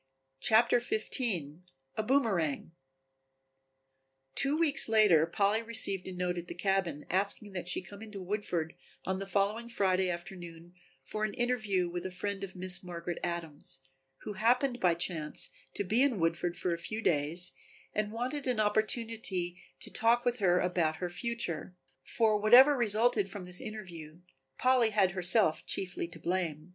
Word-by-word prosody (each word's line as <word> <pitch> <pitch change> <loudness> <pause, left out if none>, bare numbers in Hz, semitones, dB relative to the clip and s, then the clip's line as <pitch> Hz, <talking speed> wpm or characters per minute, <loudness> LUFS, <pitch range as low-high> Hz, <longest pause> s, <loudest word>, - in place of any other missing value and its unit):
CHAPTER 235 - +4
XV 220 -1 -2 0.8
A - - 0
Boomerang 200 - 0 1.6
Two 275 - +2
weeks 315 -7 +6
later 205 -8 +5
Polly 200 +5 +1
received 220 -5 +2
a - - -5
note 180 -1 -2
at 175 - -9
the - - -7
cabin 190 -7 -1
asking 200 +2 +1
that 180 -2 -5
she 180 - 0
come 200 +3 -12
into 215 -2 -8
Woodford 180 -4 -3 0.3
on 190 0 -2
the 195 - -5
following 205 +4 -1
Friday 190 -4 +1
afternoon 175 -1 -8 0.3
for 215 - -5
an 215 - -2
interview 220 -7 0
with 175 0 -5
a - - -9
friend 200 +2 -4
of 195 -1 -7
Miss 180 -1 -1
Margaret 175 -1 -6
Adams, 165 -6 -1 0.4
who 210 - -5
happened 245 +5 +1
by 175 -5 +3
chance 165 -3 -1 0.2
to - - -1
be 215 +6 +1
in 270 -5 +2
Woodford 170 +1 -1
for 180 -1 -1
a 170 - -4
few 215 +6 -5
days 165 +4 +2 0.4
and 210 0 -1
wanted 255 +5 -4
an 245 -3 0
opportunity 215 -4 -1 0.2
for - - -5
talking 235 +2 +2
with 245 0 0
her 180 -3 +3
about 175 -3 0
her 175 +1 -5
future. 185 -3 -3 0.3
For 215 - +1
whatever 250 +7 +7
resulted 220 -3 +2
from 200 -2 -8
this 180 0 -2
interview 175 -7 -9 0.4
Polly 255 -3 +3
had 200 -3 +2
herself 180 -1 +2
chiefly 180 -2 -3
to 170 - -12
blame. 165 -2 -3
195 Hz, 155 wpm, -31 LUFS, 175-220 Hz, 1.6 s, whatever